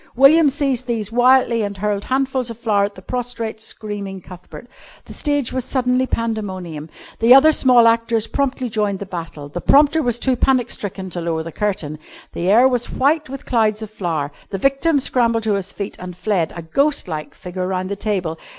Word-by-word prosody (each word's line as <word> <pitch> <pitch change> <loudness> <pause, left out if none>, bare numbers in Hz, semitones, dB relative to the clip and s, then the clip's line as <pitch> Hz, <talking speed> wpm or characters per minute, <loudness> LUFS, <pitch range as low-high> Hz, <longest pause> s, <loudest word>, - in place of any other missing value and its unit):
William 290 +4 +6
seized 270 -3 -1
these 225 -3 -2
wildly 245 -1 +4
and 200 -1 -3
hurled 205 0 -2
handfuls 265 -1 -1
of 230 - -7
flour 210 -4 +1
at 200 - -7
the 185 - -13
prostrate, 235 -2 -4
screaming 205 -3 -6
Cuthbert. 180 +6 -12 0.4
The - - -11
stage 290 -4 -1
was 260 -1 -1
suddenly 255 0 +1
pandemonium. 190 -10 -4 0.3
The 235 +3 +7
other 305 +4 +7
small 250 -5 +5
actors 230 -1 +2
promptly 265 0 -2
joined 210 -3 -1
the 200 - -6
battle. 165 -6 -7
The 175 +5 -6
prompter 295 +3 +4
was 240 -4 0
too 260 +1 +1
panic 255 -1 +1
stricken 190 -2 -5
to 175 - -4
lower 165 -1 -2
the 165 - -7
curtain. 160 -7 -3 0.3
The 175 +2 -1
air 235 +6 +6
was 245 -2 -1
white 295 +2 +1
with 275 0 -8
clouds 220 -2 +1
of 215 - -8
flour. 165 -8 -3 0.2
The 195 - -3
victim 275 - +2
scrambled 230 -3 +1
to 220 -1 +1
his 195 -1 -2
feet 200 0 -6
and 180 -1 -8
fled, 185 -6 0
a 170 - -7
ghost 280 - +1
like 155 -3 -6
figure, 180 0 -5
round 185 0 -2
the 200 - -2
table. 185 -6 -2
220 Hz, 195 wpm, -20 LUFS, 190-255 Hz, 0.4 s, The